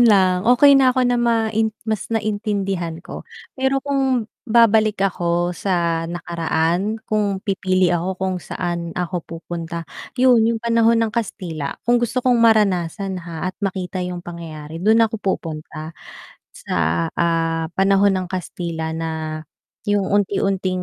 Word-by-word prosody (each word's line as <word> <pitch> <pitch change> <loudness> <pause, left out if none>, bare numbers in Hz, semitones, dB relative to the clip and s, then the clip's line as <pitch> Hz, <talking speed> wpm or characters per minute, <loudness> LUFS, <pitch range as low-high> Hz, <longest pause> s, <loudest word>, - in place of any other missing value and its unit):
lang, 190 -5 +4
okey 275 +3 +7
na 255 -1 +5
ako 255 - +3
na 245 - +2
main 225 -2 +1 0.2
mas 215 -3 -2
naintindihan 205 -6 -1
ko, - - -7 0.4
pero 265 +1 +1
kung 270 -4 +1 0.2
babalik 220 -2 +4
ako 175 -1 0
sa 170 -3 0
nakaraan, 170 +4 -1
kung 210 -2 +1
pipili 185 -3 +1
ako 175 +2 -1
kung 190 0 -1
saan 170 -1 -4
ako 180 0 -2
pupunta. 170 0 -6 0.3
Yun 250 -2 +5 0.2
yung - - -7
panahon 230 0 +3
ng 220 - -3
Kastila, 180 -10 -4
kung 240 0 +3
gusto 240 +2 0
kong 245 -2 +4
maranasan, 195 -4 +2
ha, 170 +1 -4
at 185 - -7
makita 185 -1 -3
yung 180 -1 -4
pangyayari 165 -2 -8
dun 220 +4 +4
ako 225 0 -2
pupunta 155 -4 -4 0.6
sa, 85 0 -1
ah, 165 -1 0
panahon 195 0 +4
ng 185 -1 -2
Kastila, 170 -3 -4
na 160 -1 -4 0.5
yung 205 -2 +1
unti-unting 195 -2 0
190 Hz, 135 wpm, -21 LUFS, 170-220 Hz, 0.6 s, okey